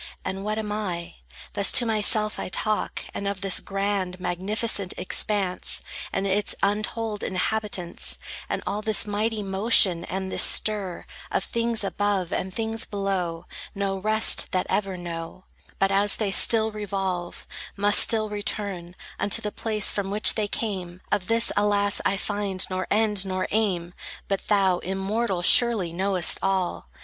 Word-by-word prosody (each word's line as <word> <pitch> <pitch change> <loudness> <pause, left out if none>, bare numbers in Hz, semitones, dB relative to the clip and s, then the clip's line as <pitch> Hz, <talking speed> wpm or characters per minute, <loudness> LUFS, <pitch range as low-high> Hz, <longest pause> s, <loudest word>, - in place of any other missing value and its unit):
And 195 +1 -4
what 215 +1 -3
am 215 -1 -4
I?" 185 - -5 0.4
Thus 200 -1 +1
to 245 - +4
myself 215 -1 +1
I - - -4
talk; 215 +3 -2
and 200 - -4
of 200 -1 -4
this 195 -2 0
grand, 195 -2 -3
Magnificent 195 +2 0
expanse, 190 -1 0 0.3
And 195 - -2
its 200 +1 +1
untold 215 +1 -2
inhabitants, 190 -2 0 0.3
And - - -3
all 210 - -3
this 220 0 +4
mighty 210 +1 -2
motion, 195 -3 +2
and 190 0 -5
this - - -1
stir 205 -5 +3 0.2
Of - - -1
things 230 -2 0
above, 200 -2 -2
and 190 - -3
things 225 +3 -3
below, 185 -4 -3 0.3
No 195 -1 -2
rest 215 +2 +3
that 185 - -1
ever 195 -3 -1
know, 170 +1 -8 0.3
But 195 0 +1
as 200 +1 +5
they 210 -3 -2
still 220 +2 +7
revolve, 195 -4 -4 0.3
must 205 +1 +5
still 220 -1 +5
return 200 -4 -4 0.2
Unto 205 - +2
the 210 -2 -5
place 215 -2 +1
from 200 -1 -3
which 210 +2 +4
they 215 -2 -1
came,— 185 -5 -5
Of 200 -3 -1
this, 230 0 +1
alas, 205 -1 +2
I 195 - 0
find 200 -2 -1
nor 185 0 -3
end 210 -2 +1
nor 185 -1 -3
aim! 185 -5 -1 0.3
But 195 -1 -3
thou, 190 -4 +2
immortal, 195 0 -2
surely 215 -6 +4
knowest 185 -1 +1
all. 185 - -2
200 Hz, 150 wpm, -24 LUFS, 185-215 Hz, 0.4 s, still